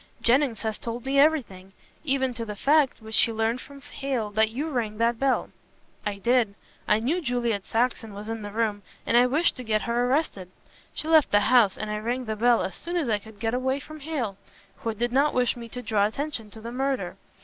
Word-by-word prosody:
"Jennings 245 -2 +2
has 220 -1 -2
told 235 +1 -5
me 275 +1 +2
everything. 225 -12 +1 0.3
Even 265 -3 0
to 230 -1 -4
the 210 -2 -6
fact, 280 +1 +2
which 220 0 +3
he 230 - +3
learned 225 +3 0
from 280 0 -12
Hale 255 -6 -3
that 220 +1 +3
you 270 +8 -3
rang 220 -5 -2
that 230 +1 +1
bell." 270 -1 +1 0.6
"I 205 - -1
did. 235 -1 +2 0.3
I 210 - +4
knew 300 +11 0
Juliet 235 - -1
Saxon 225 -2 -1
was 205 +1 -7
in 225 0 -4
the 205 - -6
room, 210 -1 -1 0.2
and - - +1
I 245 +1 +6
wished 305 +7 +2
to 250 - -6
get 215 -2 0
her 240 +1 +1
arrested. 255 - 0 0.5
She 310 - -3
left 315 -2 +5
the 205 - +4
house 220 -3 +4
and 215 0 -4
I 210 - -2
rang 245 +4 -2
the 220 -1 -2
bell 235 +2 +3
as 190 - -4
soon 345 +1 -5
as 320 -8 0
I 210 -2 +2
could 215 0 -15
get 225 +1 -1
away 260 +2 0
from 310 +2 -10
Hale, 275 -10 -3 0.4
who 230 - -2
did 240 +2 -1
not 280 +4 +2
wish 250 -1 +2
me 235 -1 -9
to 250 +2 -7
draw 205 -3 +2
attention 245 -2 -4
to 220 +1 -12
the 230 +1 -6
murder. 270 +1 -2
235 Hz, 225 wpm, -26 LUFS, 220-265 Hz, 0.6 s, I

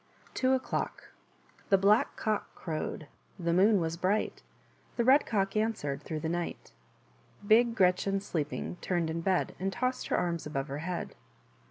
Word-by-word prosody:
r - - -24
Two 260 0 +3
Oclockr 260 - -3 0.7
|he 195 - +6
Black 205 +3 +3
Cock 215 -1 -2
crovred; 155 -2 -4 0.3
The 170 -2 -1
Af(707zwas 175 -3 +3
bright; 200 +4 0 0.6
The 235 - +2
Red 265 +4 +5
Cock 195 -2 0
answered 210 -11 -1
Through 155 +1 -5
the 160 - -2
night. 170 - -4 0.4
% - - -30
Bi>Cre^cj&ff/t^sleeping, 195 -7 +2
Turned 170 -3 0
m 165 - -2
bed. 185 +1 +1
And 190 +1 -1
tossed 255 +3 -2
her - - +1
arms 170 -3 -1
Above 135 -1 -3
her 140 +2 -4
he 160 - -6
ad. 175 - -4
185 Hz, 155 wpm, -30 LUFS, 160-215 Hz, 0.7 s, |he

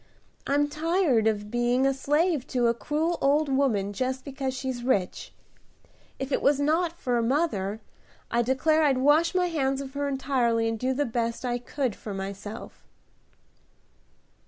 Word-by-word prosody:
I'm 290 +1 +2
tired 310 - +1
of 210 -1 -1
being 240 +2 +2
a 270 - +3
slave 295 +1 +1
to 245 -3 0
a 235 - +4
cruel 300 +9 -1
old 290 +2 +3
woman 235 -8 +1
just 260 +3 -2
because 270 -2 -3
she's 260 -2 -3
rich. 205 -8 -1 0.9
If 270 +1 -5
it - - +1
was 280 0 +3
not 320 +4 +1
for 245 -8 -1
mother, 225 - 0 0.5
I 235 - +2
declare 265 +6 +2
I'd 280 -4 +3
wash 295 +7 +3
my 365 -1 +3
hands 275 -6 0
of 270 -1 -7
her 285 0 -2
entirely, 255 -4 +1
and 225 -1 -2
do 255 +2 0
the 290 +2 +1
best 235 0 -2
I 245 0 -1
could 245 -2 -2
for 205 -3 -7
myself." 200 +3 -7
265 Hz, 160 wpm, -27 LUFS, 235-290 Hz, 0.9 s, a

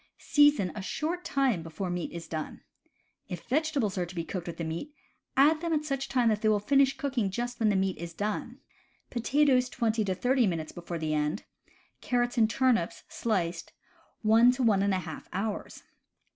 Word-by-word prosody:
Season 290 - +4
a 210 - -6
short 315 - -3
time 265 - +1
before 165 +3 -5
meat 175 -1 -3
is 170 -1 -7
done. 155 -2 -5 0.7
If 175 -2 -6
vegetables 275 -8 0
are 175 - 0
to 180 - -11
be 165 - -2
cooked 175 +1 -5
with 170 - -6
the 170 - -3
meat, 170 - -5 0.4
add 305 +3 +5
them 335 -1 -1
at 305 -1 0
such 275 -2 -2
time 245 -3 +3
that 215 -1 0
they 215 - +3
will 215 - +4
just 205 +4 -10
finish 275 -1 +4
cooking 255 -9 -1 0.3
when 220 -2 +3
the 205 - +2
meat 190 -2 0
is 170 0 -6
done 215 +6 -3 0.5
(potatoes 255 +1 +2
twenty 230 -3 0
to 190 -1 -1
thirty 250 +2 +2
minutes 165 -4 -3
before 170 0 -6
the 155 -1 -2
end; 150 0 -1 0.6
carrots 245 -1 0
and 220 -1 +4
turnips, 230 -7 +1
sliced, 175 -7 -2 0.5
one 225 +3 +6
to 255 0 -2
one 210 -4 +4
and 200 -1 +2
a - - 0
half 160 -2 -8
hours) 200 +3 -4
215 Hz, 190 wpm, -29 LUFS, 180-265 Hz, 0.7 s, one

